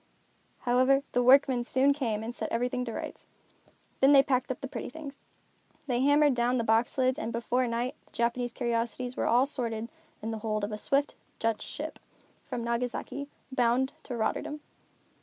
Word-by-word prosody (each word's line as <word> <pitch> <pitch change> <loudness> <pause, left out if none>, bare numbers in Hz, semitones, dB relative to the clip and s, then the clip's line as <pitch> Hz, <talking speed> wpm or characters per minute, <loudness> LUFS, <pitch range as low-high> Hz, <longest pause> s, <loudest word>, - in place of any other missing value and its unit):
However, 255 +2 +3
the 245 - +2
workmen 260 -1 +5
soon 265 +3 +3
came 230 -7 -2
and 230 +2 -4
set - - -4
everything 250 +2 0
to 230 - -4
rights. - - -7 0.7
Then 270 +2 +6
they 275 -1 +8
packed 260 -2 0
up 260 - -4
the 270 - -4
pretty - - -5
things. 280 0 -9 0.7
They 245 -4 0
hammered 290 +1 +5
down 245 +1 +1
the 235 - +1
box 225 +3 +2
lids 260 0 +2
and 225 - -3
before 245 +2 0
night 240 +3 -1
the - - -26
Japanese 240 +1 0
curiosities 240 +1 -2
were - - 0
all 245 +3 +5
stored 250 -5 -2
in 220 +1 -5 0.3
the 220 0 -3
hold 215 -1 -2
of 205 - -2
a 210 - -3
swift, 280 +5 +1 0.2
Dutch 225 -1 0
ship, - - -6 0.5
from 235 - -3
Nagasaki, 245 +4 -3 0.2
bound 255 +1 +2
for 245 - -5
Rotterdam. 295 +6 -2
245 Hz, 175 wpm, -29 LUFS, 235-270 Hz, 0.7 s, they